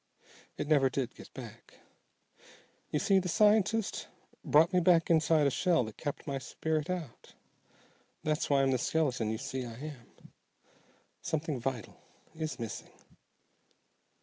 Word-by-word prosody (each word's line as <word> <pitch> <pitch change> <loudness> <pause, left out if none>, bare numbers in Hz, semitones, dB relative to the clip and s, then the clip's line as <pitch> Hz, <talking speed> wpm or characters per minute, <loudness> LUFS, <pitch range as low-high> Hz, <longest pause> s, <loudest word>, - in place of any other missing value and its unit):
It - - -3
never 140 -3 +4
did 130 -2 -2
get - - -13
back. - - -10 1.1
You - - 0
see, 195 +4 +3
the 185 -1 -3
scientist 210 +2 +2 0.4
brought 160 +5 +4
me 180 - +5
back 170 -1 +4
inside 160 -1 +4
a 140 - +3
shell 170 -1 +2
that 110 -2 -8
kept 145 -2 -4
my 140 -2 -2
spirit 155 +5 -2
out. 170 -9 -6 0.9
That's 155 +1 0
why 140 -1 +4
I'm 135 - +3
the 130 - +1
skeleton 135 -7 0
you 110 - -1
see 130 +1 -4
I 115 -2 -7
am. 135 -2 -11 0.9
Something 155 -3 -2
vital 125 -3 -4 0.3
is 155 -1 -4
missing." 115 -3 -6
150 Hz, 140 wpm, -31 LUFS, 130-165 Hz, 1.1 s, me